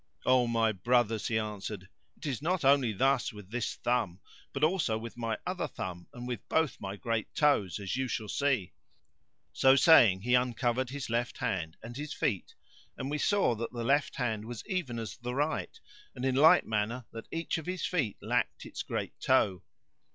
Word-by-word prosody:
"O 130 -1 +4
my 115 -1 +2
brothers," 115 +2 +1
he 110 - +1
answered, 105 -3 -4 0.3
"it - - -10
is 135 -4 -2
not 170 -1 0
only 135 -4 +5
thus 135 +5 +2
with 105 -2 -12
this 120 -1 -2
thumb, 105 -7 -1 0.3
but 140 - -3
also 155 -9 +2
with 115 +1 -7
my 115 -2 -2
other 180 0 -2
thumb 90 -1 -6
and 125 -3 -8
with 120 -5 -5
both 160 -4 +1
my 95 0 -4
great 115 +1 -2
toes, 140 - +2
as 100 -1 -3
you 130 0 -1
shall 115 -3 -3
see." 135 -5 0 0.8
So 135 0 +5
saying 120 - +7
he 125 +4 0
uncovered 125 0 +1
his 135 -3 -5
left 120 +1 -1
hand 95 -10 -2
and 120 +1 -8
his 150 +1 -5
feet, 100 -9 -2 0.4
and 135 +2 -4
we 150 - -1
saw 200 - +3
that 115 +2 -5
the 120 -1 -3
left 140 +4 +2
hand 110 -4 -2
was 120 -1 -7
even 180 - -2
as 110 -4 -5
the 125 +1 -5
right 150 +3 -1 0.4
and 125 - -4
in 130 - +2
like 160 +7 +6
manner 110 +3 -1
that 115 - -8
each 165 0 -2
of 160 - -10
his 185 0 -2
feet 150 - -1
lacked - - -1
its - - -6
great - - -4
toe. 90 -3 +2
120 Hz, 190 wpm, -30 LUFS, 110-140 Hz, 0.8 s, saying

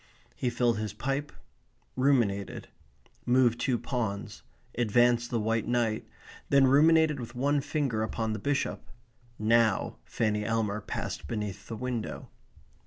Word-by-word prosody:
He 125 - -1
filled 120 -2 +1
his 105 -2 -3
pipe; 135 +6 -2 0.6
ruminated; 120 -7 +1 0.5
moved 120 -1 +3
two 125 0 +1
pawns; 110 -6 -4 0.3
advanced 120 +1 +3
the 120 - 0
white 110 0 0
knight; 115 -3 0 0.4
then 140 -1 +5
ruminated 155 +2 +5
with 120 0 -8
one 140 +3 +1
finger 135 -7 -1
upon 110 0 -2
the 110 - -4
bishop. 140 +6 -1 0.6
Now 110 -1 +2
Fanny 105 -2 -1
Elmer 105 -1 -1
passed - - -5
beneath 105 -3 -4
the 115 - -5
window. 125 -1 -4
120 Hz, 125 wpm, -29 LUFS, 110-130 Hz, 0.6 s, then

